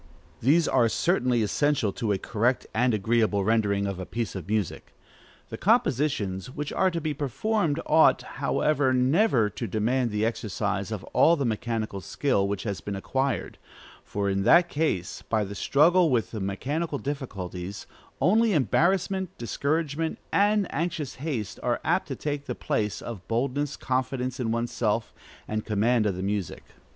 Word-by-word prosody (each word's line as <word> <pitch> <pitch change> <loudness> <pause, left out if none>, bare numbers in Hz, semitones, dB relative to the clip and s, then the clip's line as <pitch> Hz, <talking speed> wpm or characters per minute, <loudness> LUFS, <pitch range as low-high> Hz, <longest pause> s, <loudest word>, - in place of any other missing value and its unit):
These 155 +7 +4
are 120 -3 +3
certainly 125 - +1
essential 125 -1 +1
to 110 -3 -2
a 100 - +2
correct 120 +6 0
and 125 +3 +2
agreeable 110 -1 +1
rendering 100 -2 +1
of 100 -2 -3
a 95 - -4
piece 115 -3 -3
of 90 -5 -7
music: 105 -3 -3 0.5
the - - -7
compositions 135 - +1
which 145 +2 -5
are 190 - +3
to 170 -2 -3
be 155 -1 -2
performed 150 - -1
ought, 160 +1 +5
however, 140 -4 0
never 130 - +3
to 110 +3 -5
demand 115 +5 0
the 105 0 0
exercise 105 -3 -2
of 105 -3 -4
all 170 - +5
the 140 -4 -1
mechanical 110 -3 -2
skill 100 -3 0
which 100 -1 -3
has 100 -3 -3
been 100 - -4
acquired, 135 +6 -2 0.4
for 100 -1 -2
in 100 0 0
that 170 - +5
case, 105 - -1
by 110 -2 +2
the 100 0 -6
struggle 165 - +4
with 120 -4 0
mechanical 140 - -2
difficulties, 100 - -5 0.3
only 220 +4 +3
embarrassment, 185 - +1
discouragement, 150 +6 -1 0.2
and 205 0 +3
anxious 155 -2 -2
haste 135 -9 -3
are - - 0
apt - - +1
to - - -4
take 145 -1 -3
the 125 - -3
place 105 -2 -2
of 100 -6 -7
boldness, 135 +5 -1
confidence 130 0 -2
in 115 -3 -1
one's 115 +1 -2
self, 110 -1 -1 0.3
and 110 0 -2
command 110 +1 +2
of 100 - -1
the 90 - -4
music. 100 -3 -3
120 Hz, 160 wpm, -26 LUFS, 105-150 Hz, 0.5 s, ought